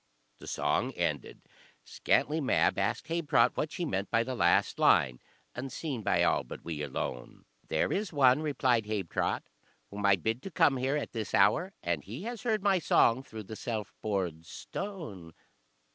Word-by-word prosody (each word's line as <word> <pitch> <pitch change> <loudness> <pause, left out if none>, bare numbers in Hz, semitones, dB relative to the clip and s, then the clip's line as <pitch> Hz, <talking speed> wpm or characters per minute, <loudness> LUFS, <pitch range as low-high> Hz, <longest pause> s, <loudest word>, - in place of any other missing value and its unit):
The - - -11
song - - 0
ended, - - -3 0.4
Scantlie 155 +2 +1
Mab 130 - +2
asked - - -1
Habetrot 155 -7 +2
what 155 - -2
she 175 - -3
meant 100 -9 -2
by 115 - +2
the 130 - -4
last 125 - +2
line, 60 -2 +4 0.3
"Unseen 135 +1 -4
by - - +2
all - - +2
but - - -10
we 80 -3 -4
alone." 65 -3 -5 0.2
"There - - 0
is 205 0 -2
one," 135 -2 +4
replied 125 -7 +1
Habetrot, 100 -5 -1 0.5
"whom 100 0 -6
I 100 - +6
bid 110 +7 -2
to 195 - -7
come 145 -5 +3
here 135 +3 0
at 150 - -4
this 110 -3 -3
hour, 180 - +3
and 85 -4 -1
he 120 - -8
has 235 0 -5
heard 220 -5 0
my 195 -2 +3
song 130 -5 +3
through 110 -5 -9
the 110 +3 -8
self 110 -3 -4
bored 90 -6 -2
stone." 115 - -7
120 Hz, 170 wpm, -30 LUFS, 100-155 Hz, 0.5 s, I